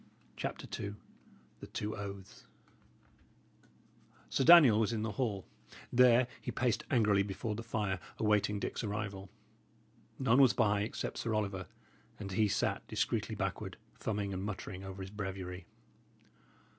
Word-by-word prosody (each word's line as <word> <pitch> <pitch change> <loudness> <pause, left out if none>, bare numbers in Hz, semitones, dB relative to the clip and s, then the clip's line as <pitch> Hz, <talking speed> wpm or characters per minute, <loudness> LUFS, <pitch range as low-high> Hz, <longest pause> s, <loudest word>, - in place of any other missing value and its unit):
CHAPTER - - -4 0.2
II 100 0 -4 0.6
THE - - -9
TWO 105 +1 -4
OATHS 100 -2 -8 1.8
Sir - - +2
Daniel 150 -9 +9
was 110 0 +2
in 110 -2 -1
the 110 - -2
hall; 105 -6 -2 0.5
there 125 0 +6 0.2
he - - -5
paced 120 -3 0
angrily 105 -6 +4
before 100 +3 -3
the 110 - -4
fire, 105 -5 -2 0.2
awaiting 105 -1 +2
Dick's - - -3
arrival. 100 -2 -4 0.9
None 130 0 +4
was 130 -3 +6
by 105 -3 +2
except 105 - -3
Sir 115 -2 -1
Oliver, 100 -3 -2 0.5
and 100 -2 -6
he 105 +3 +3
sat 100 - 0
discreetly - - -1
backward, - - -3 0.2
thumbing 100 -2 -3
and 95 0 -3
muttering 95 -2 -5
over 95 0 -6
his 95 - -8
breviary. 95 -3 -5
105 Hz, 135 wpm, -33 LUFS, 100-115 Hz, 1.8 s, Daniel